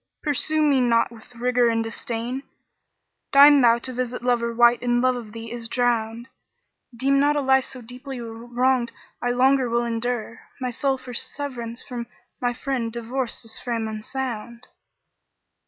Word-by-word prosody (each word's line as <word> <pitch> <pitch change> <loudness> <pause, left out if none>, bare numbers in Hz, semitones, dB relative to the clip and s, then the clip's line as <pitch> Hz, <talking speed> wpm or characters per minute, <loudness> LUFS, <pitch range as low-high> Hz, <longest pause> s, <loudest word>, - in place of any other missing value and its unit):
pursue 310 +1 +1
me 280 -3 +4
not 235 -1 +3
with 235 +1 -15
rigour 245 0 +2
and 225 0 +1
disdain: 230 +3 -4 0.5
* - - -54
Deign 285 0 +9
thou 235 -1 +6
to 255 +2 -5
visit 250 0 -3
lover 240 -1 +1
wight 240 +1 +5
in 240 0 +2
love 255 0 +3
of 230 -4 -7
thee 230 +1 -8
is 235 -1 -5
drowned; 235 -1 0 0.7
Deem 275 +3 +3
not 290 +1 +3
a - - +2
life 265 -1 +4
so 255 -2 -7
deeply 250 +3 -8
wronged 240 +2 0 0.3
I 245 - 0
longer 260 +1 +3
will 235 +1 +1
endure; 230 0 -2
* - - -29
My 250 -1 -2
soul 270 +2 0
for 255 -1 -10
severance 240 -3 -4
from 240 -3 -6 0.3
my 245 -1 +1
friend 245 -1 -2
divorced 235 +2 -3
this 225 -1 -7
frame 230 -3 -2
unsound." 235 +1 -5
245 Hz, 165 wpm, -24 LUFS, 235-260 Hz, 0.7 s, Deign